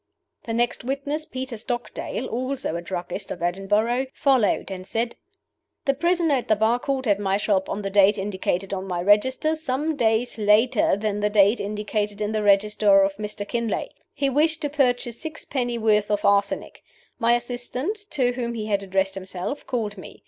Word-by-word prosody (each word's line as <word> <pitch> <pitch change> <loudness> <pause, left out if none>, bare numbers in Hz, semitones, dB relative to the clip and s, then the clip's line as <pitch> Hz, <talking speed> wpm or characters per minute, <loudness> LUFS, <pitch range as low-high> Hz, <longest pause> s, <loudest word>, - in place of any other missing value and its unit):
The 225 - -2
next 240 0 0
witness, 280 +4 -3
Peter 255 -4 -5
Stockdale 240 +2 -4
(also 255 -5 -3
a 170 - -3
druggist 180 +2 -5
of - - -5
Edinburgh), 210 +8 +1
followed, 255 -8 +2
and 185 0 -7
said: 230 +1 -2 0.7
"The 275 - +3
prisoner 340 +1 +1
at 255 -3 0
the 215 - +4
bar 220 +3 +2
called 270 0 -2
at 205 -1 +3
my 195 -1 +1
shop 200 -2 0
on 205 - -3
the 195 - -3
date 200 +1 +5
indicated 195 -1 -2
on 190 0 -4
my 180 -2 -2
register, 215 - +3
some 310 0 -2
days 225 -1 +1
later 215 +1 +3
than 210 0 -2
the 210 0 +1
date 205 +2 +4
indicated 210 0 -2
in 210 0 -1
the 215 -1 0
register 205 0 +4
of 195 0 0
Mr. 210 -1 -5
Kinlay. 235 -1 -2 0.2
He 275 - -1
wished 305 +4 +2
to 290 -2 -2
purchase 245 -4 0
sixpenny 265 -6 -3
worth 210 -2 +2
of 205 -1 0
arsenic. 200 0 +1 0.4
My 235 -1 +4
assistant, 245 - -3
to 255 -4 +1
whom 235 -1 -3
he 215 -2 -3
had 205 -2 0
addressed 195 0 0
himself, 190 +7 -5
called 215 -5 -2
me. - - -11
220 Hz, 180 wpm, -24 LUFS, 200-255 Hz, 0.7 s, date